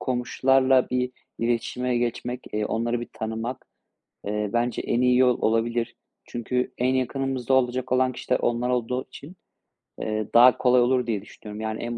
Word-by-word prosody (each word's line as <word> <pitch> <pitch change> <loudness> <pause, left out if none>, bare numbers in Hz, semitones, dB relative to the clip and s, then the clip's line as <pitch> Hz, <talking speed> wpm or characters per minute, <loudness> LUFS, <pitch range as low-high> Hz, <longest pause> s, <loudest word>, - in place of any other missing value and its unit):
komşularla 130 +1 +2
bir 125 0 -1 0.3
iletişime 120 +1 -1
geçmek, 120 +1 -2
eee, 105 0 -1
onları 115 +2 -1
bir 120 - -6
tanımak, 115 +2 -5 0.6
eee, 105 0 -1
bence 120 +1 0
en 120 - 0
iyi 125 0 +4
yol 125 -1 +3
olabilir. 115 +1 0 0.3
Çünkü 125 +1 -2
en 130 +1 +1
yakınımızda 130 -1 -1
olacak 130 0 +1
olan 130 0 +3
kişiler 125 0 -1
onlar 120 +1 0
olduğu 125 +1 -1
için, 145 +6 -12 0.7
eee, 110 -1 -2
daha 125 +2 +7
kolay 125 -1 +4
olur 125 0 +2
diye 105 -4 -1
düşünüyorum. 105 +2 -10
Yani, 110 0 -3
en 120 0 -4
125 Hz, 155 wpm, -25 LUFS, 115-125 Hz, 0.7 s, daha